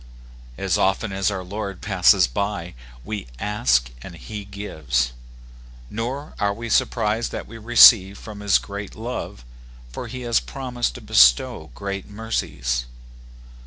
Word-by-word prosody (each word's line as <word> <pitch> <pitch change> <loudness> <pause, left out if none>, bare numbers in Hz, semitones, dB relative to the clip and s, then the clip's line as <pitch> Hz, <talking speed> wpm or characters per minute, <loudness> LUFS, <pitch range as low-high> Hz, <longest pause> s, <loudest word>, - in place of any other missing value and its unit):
As 95 -3 0
often 95 +2 +1
as 95 0 +1
our 95 -2 -4
Lord 100 0 -5
passes 95 -3 +4
by, 90 +6 -3 0.3
we 105 -7 -5
ask 105 - +1
and - - -10
he 100 - -8
gives; 75 -12 -2 0.8
nor 130 +7 -4
are 100 0 +1
we 115 +2 -6
surprised 110 +1 +1
that - - -5
we 115 - -11
receive 110 -4 +7
from 105 -2 -10
his 100 -1 +3 0.4
love; 110 - -6 0.5
for 120 - -6
he 125 +2 -7
has 120 -2 +2
promised 125 - -3
to - - -9
bestow - - +4
great 100 0 -5
mercies. 60 - -2
100 Hz, 130 wpm, -23 LUFS, 90-115 Hz, 0.8 s, receive